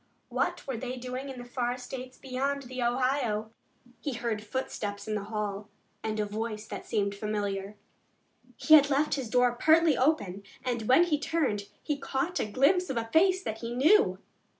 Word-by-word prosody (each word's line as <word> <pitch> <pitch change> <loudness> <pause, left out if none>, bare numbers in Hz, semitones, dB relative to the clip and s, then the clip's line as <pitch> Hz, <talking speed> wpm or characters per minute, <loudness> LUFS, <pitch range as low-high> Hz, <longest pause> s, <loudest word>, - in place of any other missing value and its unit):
What - - -1
were 265 -4 -3
they 255 +2 -4
doing 255 +2 -5
in 265 - -7
the 245 - -8
far 245 0 -2
states 255 0 -8
beyond 275 +2 -2
the 255 0 -6
Ohio? 240 -3 0 0.5
He 285 - -3
heard 230 -3 -2
footsteps 205 -3 -4
in 215 - -1
the 205 -1 -2
hail 210 -1 -4 0.3
and 215 -1 -2
a 210 - +1
voice 215 +1 -4
that - - -7
seemed 200 -2 0
familiar. 205 -1 -3 0.8
He 315 - +3
had 290 -2 +8
left 290 +2 +2
his 265 -5 -2
door 245 +1 +4
partly 315 +4 +4
open, 205 - +1 0.2
and, 235 -4 -2
when 260 +7 +7
he 315 -4 +1
turned, 270 -12 0 0.2
he 295 -2 -2
caught 285 +6 -2
a - - 0
glimpse 300 - +3
of 265 - -2
a 225 0 -3
face 375 +3 +4
that 220 -7 -4
he 235 +1 -5
knew. 330 +12 +5
250 Hz, 180 wpm, -29 LUFS, 215-275 Hz, 0.8 s, had